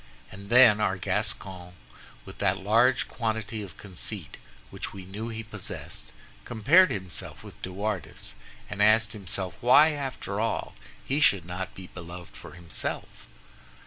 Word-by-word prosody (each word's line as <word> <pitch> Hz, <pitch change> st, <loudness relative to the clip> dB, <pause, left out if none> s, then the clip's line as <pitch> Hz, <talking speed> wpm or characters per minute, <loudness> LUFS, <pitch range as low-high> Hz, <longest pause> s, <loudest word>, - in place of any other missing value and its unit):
And 100 Hz, +1 st, -11 dB
then 120 Hz, -3 st, +8 dB
our 95 Hz, -2 st, +1 dB
Gascon, 90 Hz, -1 st, -2 dB, 0.5 s
with -, -, -11 dB
that 95 Hz, -1 st, +2 dB
large 115 Hz, +6 st, +3 dB
quantity 110 Hz, -2 st, -3 dB
of 95 Hz, -5 st, -9 dB
conceit 95 Hz, -5 st, -5 dB, 0.3 s
which -, -, -5 dB
we 95 Hz, -2 st, -8 dB
know 105 Hz, +5 st, -5 dB
he 115 Hz, -1 st, -5 dB
possessed, 105 Hz, -4 st, -7 dB, 0.3 s
compared 145 Hz, -, +5 dB
himself 95 Hz, -4 st, -4 dB
with -, -, -13 dB
De 95 Hz, -, -5 dB
Wardes, 100 Hz, -, -3 dB, 0.3 s
and 105 Hz, 0 st, -4 dB
asked 110 Hz, +1 st, +5 dB
himself 95 Hz, -2 st, -4 dB
why, 140 Hz, +6 st, +7 dB
after 135 Hz, -8 st, -4 dB
all, 115 Hz, 0 st, -1 dB, 0.3 s
he 140 Hz, +3 st, +1 dB
should 100 Hz, -, +4 dB
not 90 Hz, +2 st, -5 dB
be 95 Hz, -, -9 dB
beloved 85 Hz, 0 st, -10 dB
for -, -, -11 dB
himself? 85 Hz, -3 st, -4 dB
105 Hz, 145 wpm, -28 LUFS, 95-115 Hz, 0.5 s, then